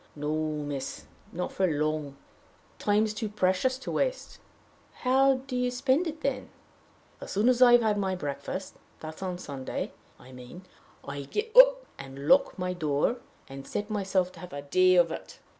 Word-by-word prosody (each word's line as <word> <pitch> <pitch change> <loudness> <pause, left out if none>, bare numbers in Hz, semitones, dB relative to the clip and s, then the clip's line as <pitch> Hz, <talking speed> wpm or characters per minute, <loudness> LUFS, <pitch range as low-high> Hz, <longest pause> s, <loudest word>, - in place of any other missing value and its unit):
"No, 150 +1 -3 0.3
miss 140 -2 -5 0.3
not 180 +2 -4
for 190 - +1
long. 150 -2 -2 0.6
Time's 210 +1 +1
too 215 0 -4
precious 205 +6 +1
to 265 - -6
waste." - - -2 0.6
"How 265 +1 +4
do 265 -2 -5
you 250 0 +1
spend 265 +7 +1
it, 310 0 -6
then?" 260 -3 -2 0.7
"As - - -8
soon 205 +4 +2
as 250 0 +3
I've 240 -1 +7
had 210 -2 +1
my 190 -1 -1
breakfast 180 +4 -5 0.2
that's 155 +3 -9
on 185 -2 -3
a - - -8
Sunday, 140 -6 -5 0.3
I 130 - -15
mean 125 +8 -11 0.4
I 140 0 -5
get 435 - -4
up - - +8
and 135 +1 -8
lock 275 -4 +4
my 180 -1 -2
door, 155 - 0 0.3
and 135 0 -10
set 205 +1 -4
myself 190 -3 0
to - - -15
have 180 -5 -10
a 145 0 -6
day 185 +5 +4
of 175 -2 +4
it. - - -8
190 Hz, 175 wpm, -28 LUFS, 150-250 Hz, 0.7 s, up